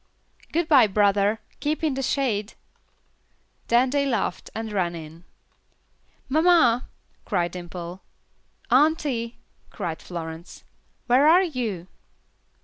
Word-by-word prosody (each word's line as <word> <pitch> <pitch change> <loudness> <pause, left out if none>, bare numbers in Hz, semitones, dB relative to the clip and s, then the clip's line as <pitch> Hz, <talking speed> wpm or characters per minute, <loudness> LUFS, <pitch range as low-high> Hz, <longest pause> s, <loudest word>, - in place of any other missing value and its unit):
"Good 335 0 0
bye, 265 -8 +6
brother, 205 +1 +2 0.2
keep 305 +2 -2
in 305 -3 +1
the 270 - -3
shade." 235 -6 -1 1.1
Then 245 +2 +3
they 280 0 +1
laughed 225 -8 -2
and 225 -1 -4
ran 180 -4 -1
in. 165 +1 -10 1.0
"Mamma," 310 -6 +4 0.4
cried 175 -5 -1
Dimple. 175 0 -8 0.7
"Auntie," 260 -4 +2 0.3
cried 170 -6 -5
Florence, 165 -1 -8 0.4
"where 260 +4 +4
are 350 +4 +6
you?" 235 - -3
230 Hz, 105 wpm, -24 LUFS, 180-280 Hz, 1.1 s, bye